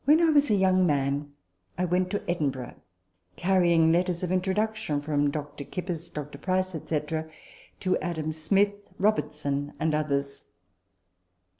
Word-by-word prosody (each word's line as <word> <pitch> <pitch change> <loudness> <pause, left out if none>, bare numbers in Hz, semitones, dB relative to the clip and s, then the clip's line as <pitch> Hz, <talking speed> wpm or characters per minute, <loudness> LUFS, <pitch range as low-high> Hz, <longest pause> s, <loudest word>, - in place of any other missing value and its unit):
" - - -36
When 300 +3 +6
a 320 -3 +5 0.2
young 185 -1 +4
man, 140 0 0 0.5
I 180 - +1
went 180 +1 +1
to 205 - -3
Edinburgh, 135 -8 -2 0.6
carry 180 - +3
ing 165 -1 +5
letters 180 +1 +1
of 180 - -1
introduction 195 -2 0
(from 145 0 +1
Dr. 145 0 -5
Kippis, 175 +1 -5
Dr. 145 -1 -7
Price, 185 +3 0
&c.) 160 -2 -2 0.8
to 185 - +2
Adam 160 -3 -2
Smith, 200 +6 +1
Robertson, 150 -8 0
and 155 0 +1
others. 140 -2 -1
170 Hz, 135 wpm, -27 LUFS, 145-185 Hz, 0.8 s, When